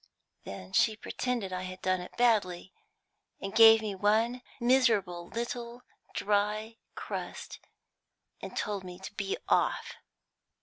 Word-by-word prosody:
Then 95 -1 -8
she 220 - +4
pretended 225 -3 -3
I 185 - -2
had 185 0 -7
done 185 -1 +1
it 180 - -11
badly, 200 -7 +2 0.7
and 195 - -5
gave 225 0 +8
me 210 -2 -2
one 220 +5 +1 0.2
miserable 225 -9 +2
little 235 +1 -5 0.3
dry 210 +2 0 0.2
crust, - - -6 0.8
and - - -7
told 205 -2 -2
me 180 -1 -8
to 190 - -9
be 195 -1 -2
off. - - +1
210 Hz, 125 wpm, -30 LUFS, 185-230 Hz, 0.8 s, gave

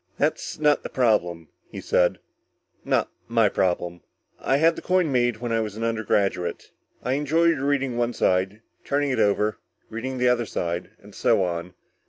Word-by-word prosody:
"That's - - -1
not 150 -1 +3
the - - -6
problem," 90 - +1 0.2
he - - -7
said, 90 -1 +2 0.7
"not - - 0 0.2
my 115 -3 +3
problem. 90 -2 -1 0.4
I 135 - +1
had 165 +3 +4
the - - -7
coin 180 -4 +1
made 120 -3 +2
when 120 +1 -4
I 115 - +2
was 110 -1 -4
an 115 - -4
undergraduate. 105 -5 -1 0.3
I 125 - 0
enjoyed 160 +3 +2
reading 135 -3 0
one 120 0 0
side, 95 +3 0 0.2
turning 145 0 0
it 130 - -1
over, 105 +1 +2 0.3
reading 130 +4 -4
the 125 0 +2
other 120 -2 +2
side, 85 +1 -3
and - - -14
so 95 - +2
on. 90 0 -4
115 Hz, 170 wpm, -24 LUFS, 95-135 Hz, 0.7 s, had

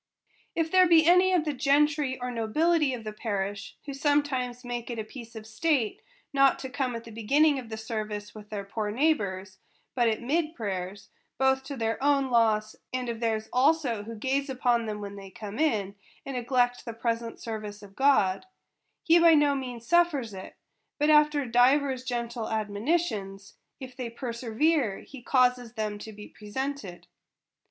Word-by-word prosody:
If 325 -1 0
there 370 -1 +6
be 325 -2 +6
any 360 +2 +5
of 350 -4 +2
the 300 - -1
gentry 285 0 +2
or 250 0 -3
nobility 300 +7 +1
of 230 - -9
the 215 -1 -6
parish, 200 -2 -4
who 280 - -5
sometimes 270 -4 0
make 240 -1 -4
it 235 - -4
a 220 - -2
piece 230 +1 -11
of 220 -1 -8
state 235 0 0 0.3
not 275 -1 +4
to 265 - -7
come 255 -2 -2
at 230 - -6
the 230 - -11
beginning 275 +7 +3
of 225 -3 -7
service 215 -2 -5
with 210 -1 -12
their 205 -2 -4
poor 210 +1 -3
neighbors, 200 -8 -1 0.3
but 240 -2 +2
at 220 - -1
mid 305 +6 -1
prayers, 195 -2 -5 0.3
both 265 0 +2
to 280 0 -6
their 225 +2 -2
own 280 -2 +2
loss, 215 -2 +2 0.2
and 255 -1 -2
of 230 -1 -4
theirs 220 -2 -1
also 265 -4 +2
who 225 +2 -8
gaze 270 +5 -1
upon 245 -3 +1
them 210 -1 -4
when 200 0 -7
they 195 -1 -9
come 210 +4 -8
in, 210 -11 +1 0.3
and 275 - -5
neglect 245 0 +1
the 230 - -6
present 230 0 -3
service 215 -2 -6
of 195 -1 -14
God; 265 - +3 0.6
he 340 -2 +5
by 335 -1 +7
no 290 -1 +4
means 250 -4 -5
suffers 300 -9 +2
it, 190 0 -9 0.4
but 300 +1 +3
after 300 -2 +4
divers 255 +2 +3
gentle 235 -2 -3
admonitions, 210 - -2 0.3
if 255 -2 -9
they 245 -2 -5
perservere, 235 +1 -1
he 270 -3 -11
causes 250 -2 +2
them 215 -2 -3
to 220 - -8
be 210 0 -11
presented. 215 -3 -6
245 Hz, 175 wpm, -28 LUFS, 215-280 Hz, 0.6 s, by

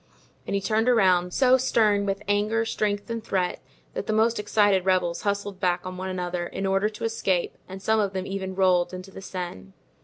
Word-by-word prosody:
And - - -1
he 200 - 0
turned 220 +4 +1
around, 185 -6 +3
so 260 +4 +4
stern 210 -5 +2
with 195 +1 -2
anger, 210 +3 +1
strength 205 -2 -1
and 230 -1 -3
threat, 185 -4 -1 0.3
that - - -4
the 215 - 0
most 225 +1 +2
excited 205 -2 +3
rebels 180 -2 +1
hustled 200 -1 -2
back 180 -1 0
on 185 0 -5
one 185 +1 -4
another, 180 -1 -3
in 195 - -4
order 195 +2 +2
to 215 - -10
escape, 195 -6 0
and 190 +1 -8
some 220 +1 +2
of 200 -2 +1
them 190 -1 -3
even 190 -1 -4
rolled 185 -1 +2
into 185 +1 -9
the 195 - -10
Seine. 175 - -7
195 Hz, 205 wpm, -25 LUFS, 185-210 Hz, 0.3 s, so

